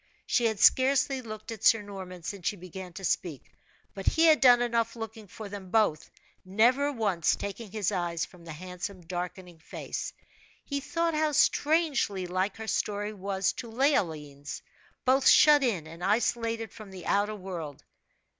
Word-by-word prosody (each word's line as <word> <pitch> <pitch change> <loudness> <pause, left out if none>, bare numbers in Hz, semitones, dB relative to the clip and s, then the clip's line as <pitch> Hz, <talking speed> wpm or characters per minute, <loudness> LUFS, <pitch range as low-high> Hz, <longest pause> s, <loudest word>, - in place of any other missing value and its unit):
She 240 - +1
had 220 -3 0
scarcely 265 0 +4
looked 215 -2 -8
at 220 -2 -8
Sir 225 -2 +5
Norman 190 -3 -9
since 190 0 -5
she - - 0
began 185 0 -9
to 195 +2 -9
speak, 165 -6 -2 0.4
but 195 -1 -8
he 320 - +3
had 315 -2 +6
done 245 -2 +7
enough 230 -1 0
looking 225 -2 -8
for 210 +3 -9
them 200 -2 -8
both, 205 -8 +1 0.3
never 240 +9 +3
once 200 - +1
taking 200 +2 -6
his 210 -3 -1
eyes 170 -3 -1
from 175 -2 -17
the 165 - -9
handsome 180 +3 -7
darkening 180 0 -6
face. 160 - -6 0.5
He 280 -1 -2
thought 335 +4 -1
how 305 0 +1
strangely 290 - +2
like 185 +3 -1
her 220 - -6
story 210 -1 -2
was 195 -1 -1
to 235 - -6
Leoline's 160 - -1 0.4
both 265 +1 +4
shut 300 -1 +7
in 200 -11 0
and 165 +2 -10
isolated 225 +2 0
from 215 -3 -11
the 185 -2 -10
outer 205 +1 +1
world. 175 -7 -7
205 Hz, 165 wpm, -28 LUFS, 180-235 Hz, 0.5 s, done